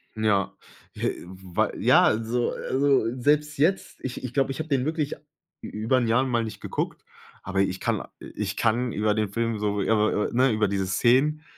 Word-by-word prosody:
Ja, 105 Hz, -3 st, +1 dB, 0.4 s
äh, -, -, -1 dB
wei 95 Hz, -1 st, -2 dB
ja, -, -, +5 dB
also 115 Hz, +2 st, +1 dB
also, 135 Hz, -3 st, +1 dB
selbst 150 Hz, +3 st, +1 dB
jetzt, 170 Hz, +7 st, 0 dB
ich 130 Hz, -1 st, -5 dB
ich 125 Hz, -, -5 dB
glaube, 135 Hz, -1 st, +1 dB
ich 135 Hz, -, -6 dB
hab 155 Hz, -, -3 dB
den 135 Hz, -2 st, +1 dB
wirklich 155 Hz, -2 st, -2 dB, 0.5 s
ü -, -, -5 dB
über 110 Hz, +5 st, 0 dB
'n 120 Hz, -, +1 dB
Jahr 120 Hz, +4 st, +3 dB
mal 120 Hz, -3 st, 0 dB
nicht 110 Hz, -, -7 dB
geguckt, -, -, -4 dB, 0.4 s
aber 95 Hz, +1 st, 0 dB
ich 95 Hz, -1 st, -1 dB
kann -, -, -1 dB, 0.2 s
ich -, -, -5 dB
kann 120 Hz, +1 st, +1 dB
über 105 Hz, 0 st, +1 dB
den 105 Hz, -2 st, -1 dB
Film 115 Hz, +1 st, -2 dB
so, 105 Hz, -1 st, -1 dB
ja, 115 Hz, -, +2 dB
w 105 Hz, 0 st, +1 dB
w -, -, -10 dB
ne, 130 Hz, +2 st, +3 dB
über 110 Hz, -1 st, +1 dB
diese 95 Hz, -1 st, -1 dB
Szenen, 135 Hz, +10 st, +2 dB
115 Hz, 195 wpm, -25 LUFS, 105-135 Hz, 0.5 s, ja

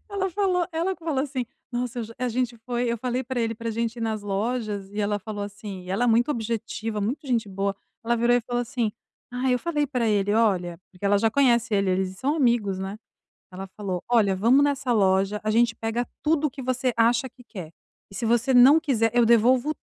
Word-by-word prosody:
Ela 385 Hz, -2 st, -1 dB
falou 365 Hz, -2 st, +1 dB
ela 340 Hz, +4 st, -1 dB
que 335 Hz, -, -18 dB
falou 285 Hz, -5 st, 0 dB
assim: 260 Hz, -3 st, -3 dB, 0.3 s
"Nossa, 245 Hz, 0 st, -3 dB
eu -, -, -2 dB
já". 230 Hz, +1 st, -11 dB
A 250 Hz, 0 st, -1 dB
gente 245 Hz, 0 st, -2 dB
foi 245 Hz, 0 st, -1 dB
eu 235 Hz, -, -1 dB
falei 250 Hz, +2 st, -2 dB
pra 255 Hz, -1 st, -3 dB
ele 225 Hz, 0 st, -1 dB
pra 230 Hz, 0 st, -4 dB
gente 230 Hz, +1 st, -2 dB
ir -, -, -7 dB
nas 220 Hz, -2 st, -2 dB
lojas 205 Hz, -1 st, -3 dB
e 210 Hz, -, -4 dB
ela 205 Hz, 0 st, 0 dB
falou 205 Hz, 0 st, -6 dB
assim 205 Hz, -2 st, -8 dB
e 180 Hz, -, -8 dB
ela 215 Hz, +6 st, +1 dB
é -, -, +2 dB
muito 235 Hz, +5 st, +3 dB
objetiva, 225 Hz, -2 st, -3 dB
muito 250 Hz, +8 st, -3 dB
gente 230 Hz, -5 st, 0 dB
boa. 195 Hz, +1 st, -2 dB, 0.3 s
Ela 235 Hz, +1 st, +1 dB
virou 235 Hz, +1 st, +3 dB
e 245 Hz, -, +1 dB
falou 245 Hz, +1 st, -2 dB
assim: 240 Hz, -3 st, -2 dB, 0.4 s
"Ai, 250 Hz, 0 st, +1 dB
eu -, -, 0 dB
falei 300 Hz, -2 st, -1 dB
pra 250 Hz, -5 st, -1 dB
ele 205 Hz, -1 st, +1 dB
'Olha'". 180 Hz, -7 st, +1 dB
Porque 185 Hz, +1 st, -13 dB
ela 200 Hz, 0 st, +4 dB
já 225 Hz, +1 st, +2 dB
conhece 235 Hz, -4 st, +2 dB
ele, 195 Hz, -1 st, +2 dB
eles 185 Hz, 0 st, -1 dB
são 285 Hz, +4 st, 0 dB
amigos, 235 Hz, -9 st, +1 dB
né. 190 Hz, +2 st, -5 dB, 0.6 s
Ela 190 Hz, +1 st, -7 dB
falou: 190 Hz, -4 st, -3 dB
"Olha, 215 Hz, -5 st, +3 dB
vamos 240 Hz, +8 st, +4 dB
nessa 275 Hz, -3 st, +1 dB
loja, 195 Hz, 0 st, +2 dB
a 215 Hz, -, -1 dB
gente 230 Hz, +1 st, +3 dB
pega 225 Hz, +2 st, -2 dB, 0.2 s
tudo 310 Hz, 0 st, +2 dB
o -, -, -3 dB
que 265 Hz, 0 st, -8 dB
você 255 Hz, 0 st, 0 dB
acha 235 Hz, +3 st, +3 dB
que 250 Hz, 0 st, -19 dB
quer. 190 Hz, -9 st, -9 dB, 0.4 s
S 195 Hz, -, -6 dB
se -, -, -2 dB
você 240 Hz, +3 st, +2 dB
não 260 Hz, +5 st, +8 dB
quiser, 230 Hz, -7 st, +1 dB
eu 240 Hz, -1 st, +5 dB
devolvo 245 Hz, +5 st, +4 dB
235 Hz, 230 wpm, -25 LUFS, 210-255 Hz, 0.6 s, não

